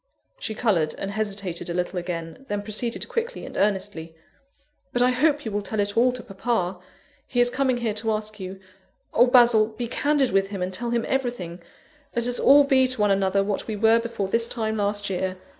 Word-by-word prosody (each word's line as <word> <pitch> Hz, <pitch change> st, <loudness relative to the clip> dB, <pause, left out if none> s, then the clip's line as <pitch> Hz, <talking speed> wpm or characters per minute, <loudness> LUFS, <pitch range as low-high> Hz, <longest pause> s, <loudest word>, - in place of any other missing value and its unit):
(She 220 Hz, -, -4 dB
coloured, 175 Hz, -10 st, +1 dB
and 195 Hz, -, -4 dB
hesitated 200 Hz, -5 st, -3 dB
a 170 Hz, -, -3 dB
little 180 Hz, +1 st, -1 dB
again, 175 Hz, +7 st, -6 dB
then 205 Hz, 0 st, -2 dB
proceeded 225 Hz, +3 st, -3 dB
quickly 470 Hz, +1 st, -3 dB
and -, -, -10 dB
earnestly:) 190 Hz, -5 st, -1 dB, 0.8 s
"But 245 Hz, -1 st, +2 dB
I 250 Hz, -, +4 dB
hope 295 Hz, +3 st, +2 dB
you 220 Hz, -, -3 dB
will 205 Hz, 0 st, -1 dB
tell 210 Hz, +2 st, -4 dB
it 205 Hz, 0 st, 0 dB
all 250 Hz, +2 st, +4 dB
to 250 Hz, -2 st, -6 dB
papa: 195 Hz, -3 st, -2 dB, 0.5 s
he 245 Hz, -, -1 dB
is 245 Hz, 0 st, +4 dB
coming 260 Hz, -1 st, +1 dB
here 235 Hz, -3 st, -1 dB
to 220 Hz, +1 st, -1 dB
ask 215 Hz, 0 st, -4 dB
you 190 Hz, 0 st, -7 dB, 0.5 s
oh, 245 Hz, +2 st, +5 dB
Basil! 240 Hz, -3 st, +6 dB
be 225 Hz, +2 st, -5 dB
candid 285 Hz, +2 st, +1 dB
with 195 Hz, 0 st, +2 dB
him, 195 Hz, -2 st, -4 dB
and 185 Hz, +1 st, -3 dB
tell 235 Hz, +5 st, -3 dB
him 235 Hz, -1 st, 0 dB
everything; 240 Hz, -10 st, -2 dB, 0.5 s
let 235 Hz, 0 st, 0 dB
us 245 Hz, 0 st, -1 dB
all 285 Hz, +1 st, +7 dB
be 265 Hz, -2 st, +4 dB
to 255 Hz, -2 st, -1 dB
one 205 Hz, -1 st, +3 dB
another 195 Hz, 0 st, +2 dB
what 200 Hz, 0 st, -2 dB
we 220 Hz, -, -3 dB
were 225 Hz, +2 st, +4 dB
before 230 Hz, -4 st, -3 dB
this 230 Hz, +4 st, 0 dB
time 220 Hz, -2 st, -2 dB
last 205 Hz, 0 st, -1 dB
year! 185 Hz, 0 st, -2 dB
215 Hz, 210 wpm, -24 LUFS, 195-245 Hz, 0.8 s, all